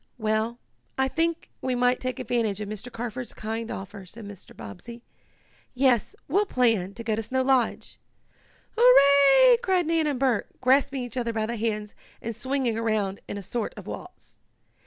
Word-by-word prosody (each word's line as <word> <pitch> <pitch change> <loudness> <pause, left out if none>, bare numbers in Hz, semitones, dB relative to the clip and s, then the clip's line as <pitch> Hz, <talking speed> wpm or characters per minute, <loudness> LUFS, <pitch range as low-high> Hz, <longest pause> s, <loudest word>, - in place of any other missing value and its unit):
"Well, 220 +1 -1 0.4
I 265 0 +2
think 330 +4 -2
we 255 -1 -1
might 245 +1 +2
take 255 0 -3
advantage 230 -5 -1
of 210 - -4
Mr. 215 +4 -7
Carford's 240 +1 -6
kind 225 +1 -4
offer," 195 +1 -7
said 220 +4 -10
Mr. 200 -2 -12
Bobbsey. 230 - -10 0.7
"Yes, 250 -4 +2
we'll 400 +8 +2
plan 225 - +1
to 230 - -7
go 220 -1 0
to 225 - -2
Snow 260 +4 -1
Lodge!" 260 -3 0 0.8
"Hurrah!" 440 - +7
cried 375 -6 +1
Nan 325 -1 +1
and 280 -4 -1
Bert, 255 -5 0
grasping 265 +1 +2
each 245 +1 -7
other 235 -2 -1
by 220 -1 -1
the 235 +2 -3
hands 215 -2 -2 0.3
and 230 0 -5
swinging 260 -3 -1
around 215 -4 -1
in - - -5
a 200 - -7
sort 230 +3 -4
of - - -9
waltz. - - -10
240 Hz, 170 wpm, -26 LUFS, 220-265 Hz, 0.8 s, Hurrah